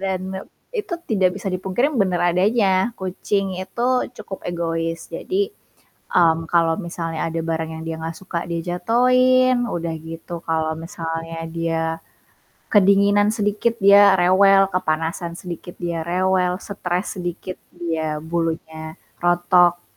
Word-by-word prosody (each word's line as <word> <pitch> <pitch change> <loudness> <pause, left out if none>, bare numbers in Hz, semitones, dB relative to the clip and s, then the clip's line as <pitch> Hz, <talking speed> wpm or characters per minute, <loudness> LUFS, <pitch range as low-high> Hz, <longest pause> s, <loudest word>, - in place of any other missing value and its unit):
Dan, 190 -1 -1 0.2
e - - -7 0.3
itu 420 -7 -3
tidak 190 -4 +1
bisa 195 -2 -4
dipungkiri 190 +11 0
bener 190 -8 +1
adanya, 195 +2 +2
kucing 190 0 -2
itu 235 +6 -2 0.3
cukup 190 - -8
egois. 165 -1 -2
Jadi, 395 - -1 0.6
mmm, 165 -2 +3
kalau 165 +1 +2
misalnya 165 -3 -3
ada 165 0 -3
barang 160 -1 -2
yang - - -7
dia 165 0 -4
gak 160 0 -5
suka, 185 -2 -4
dia 170 -1 -2
jatohin, 250 +6 +3
udah 170 -4 -3
gitu 165 +1 -7
kalau 160 -1 0
misalnya 165 0 -5
dia 165 -1 -1 0.9
kedinginan 205 +1 +4
sedikit 210 +2 0
dia 200 0 +8
rewel, 195 +2 +5
kepanasan 170 0 -1
sedikit 175 0 -8
dia 170 -1 -2
rewel, 180 0 +1
stres 185 -1 -3
sedikit 180 +1 -5 0.2
dia 165 -2 -2 0.2
bulunya 160 -1 -3 0.3
rontok. 175 0 +3
180 Hz, 125 wpm, -21 LUFS, 165-200 Hz, 0.9 s, dia